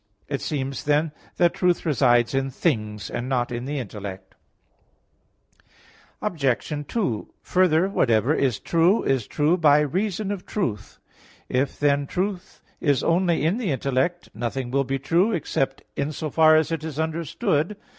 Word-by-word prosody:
It 140 - -3
seems, 135 -3 -3
then, 150 +2 +2 0.3
that 175 -1 +4
truth 180 -1 +1
resides 120 -6 +3
in 135 0 0
things, 110 -8 -1
and 125 +2 -4
not 125 -2 0
in 120 +1 -4
the 145 +2 -3
intellect. 100 -5 -7 1.9
Obj. 145 - -1
2: 160 - -2
Further, 180 -1 +3
whatever 120 - +2
is 130 -8 +1
true, 170 +6 +2
is 130 -6 0
true 150 +4 +2
by 150 -3 +5
reason 190 +6 -1
of 195 -3 -4
truth. 110 - -3 0.5
If, 130 +2 0
then, 145 -1 +2
truth 190 +1 -4 0.2
is 145 -4 +1
only 170 -2 +2
in 185 +9 +1
the 220 -7 -2
intellect, 140 +5 -1
nothing 120 +1 -3
will 140 +1 +1
be 135 +1 -1
true 170 - +2
except 135 -5 -1
in 140 +2 -1
so 155 0 -4
far 155 +1 +6
as 155 +1 +2
it 165 -2 -2
is 155 -2 -5
understood. 160 - -1
145 Hz, 150 wpm, -24 LUFS, 130-170 Hz, 1.9 s, far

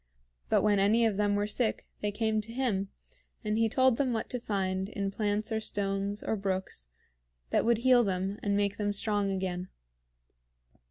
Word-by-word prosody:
But - - +3
when 205 -2 +3
any 220 +4 +4
of 220 -3 +1
them 205 -1 +2
were 205 0 +1
sick 220 +2 -1
they 210 - -1
came 220 0 0
to 220 +2 -8
him, 225 -6 -1 0.5
and 210 -1 0
he 225 0 +2
told 260 0 +3
them 260 -3 +1
what 225 - -3
to 250 - -2
find 190 -3 -2
in 200 -2 -3
plants 210 +1 -1
or 220 - +1
stones 200 -1 -2
or - - 0
brooks 190 - -3 0.6
that - - +2
would 235 -1 +4
heal 245 +1 +5
them 195 0 -2
and 200 -1 +1
make 205 0 0
them 205 -1 0
strong 205 -1 0
again. 185 -1 -2
205 Hz, 180 wpm, -30 LUFS, 195-225 Hz, 0.6 s, heal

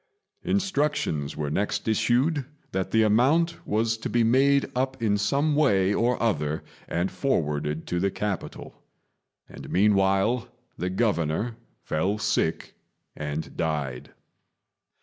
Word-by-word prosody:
Instructions 150 - 0
were 75 -2 -2
next 100 +5 -1
issued 130 +6 +2 0.3
that 95 0 -2
the 110 0 +3
amount 140 +11 +2
was 110 +1 +1
to - - -4
be 120 -1 +2
made 135 +4 +4
up 130 +1 -1
in 110 -3 +2
some 140 +8 +1
way 100 -10 +3
or 120 +3 +1
other 75 -9 0 0.2
and 90 +3 -1
forwarded 75 - -1
to 90 - -2
the 100 +2 +1
capital; 100 -2 -5 0.7
and - - -10
meanwhile 100 +4 +2 0.3
the 90 - -2
Governor 100 +1 0 0.3
fell 95 +7 0
sick 110 - -1 0.4
and 75 +1 -5
died. 75 -6 -2
105 Hz, 120 wpm, -26 LUFS, 85-125 Hz, 0.7 s, made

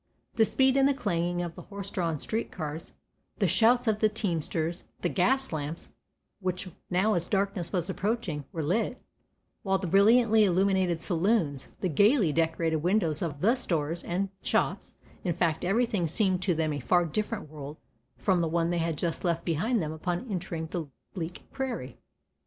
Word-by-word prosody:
The 220 - +4
speed 265 +3 +3
and 270 0 +5
the 280 - +2
clanging 175 -7 -1
of 170 -1 -5
the - - -10
horse 200 -1 -6
drawn 165 -4 -1
street 220 +10 -3
cars, 155 +1 -6 0.4
the 200 - +2
shouts 230 +8 +4
of 215 -1 +2
the 215 - +4
teamsters, 170 -4 -2 0.2
the - - +1
gas 265 +8 +1
lamps, 155 +1 -4 0.5
which 185 -1 -2 0.2
now 190 +4 +2
as 175 -2 0
darkness 195 -3 -1
was 180 -3 -1
approaching 195 -6 -2
were 160 - -3
lit, 215 - 0 0.6
while 195 -1 +1
the 190 - -4
brilliantly 220 +4 +5
illuminated 190 -2 +2
saloons, 170 - 0
the 185 - +1
gayly 200 - +4
decorated 165 0 +1
windows 170 -2 +1
of 150 -4 -3
the 225 +5 +5
stores 170 - -2
and 190 +3 -1
shops, - - -1 0.3
in 175 -3 0
fact 165 -2 0
everything 200 -2 +1
seemed 185 +2 +1
to 185 -2 +1
them 155 -1 0
a 145 - -3
far 175 +6 +3
different 210 +3 -3
world 150 0 -8 0.4
from 185 -3 +2
the 165 - 0
one 170 +1 +1
they 175 - 0
had 165 -2 -1
just 165 +2 -2
left 170 -2 0
behind 200 +9 +1
them 155 -4 -2
upon 175 +5 -3
the 170 -4 -4 0.3
bleak 175 -2 -5
prairie. 240 - -4
180 Hz, 170 wpm, -28 LUFS, 165-210 Hz, 0.6 s, and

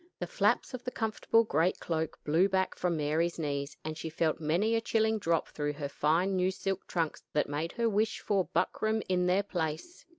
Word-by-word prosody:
The - - -3
flaps - - +1
of 255 - -5
the 250 - -2
comfortable 225 -1 +1
great 175 -3 +1
cloak 160 -2 -2
blew 165 +6 +3
back 190 -1 +1
from 175 -2 -1
Mary's 155 +3 0
knees, 145 -2 -3
and 155 0 -3
she 160 +1 -5
felt 160 0 0
many 170 +9 +1
a 225 - +2
chilling 220 -1 +1
drop 165 -4 0
through 145 -1 -2
her 145 -1 -4
fine 165 +7 +1
new 185 0 +2
silk 195 0 -3
trunks 165 -3 -1
that 150 - +2
made 150 +4 -3
her 235 -1 +1
wish 215 0 +1
for 195 -3 +1
buckram 220 0 0
in 180 -1 +1
their 190 +3 +3
place. 175 - -4
180 Hz, 200 wpm, -31 LUFS, 155-210 Hz, -, blew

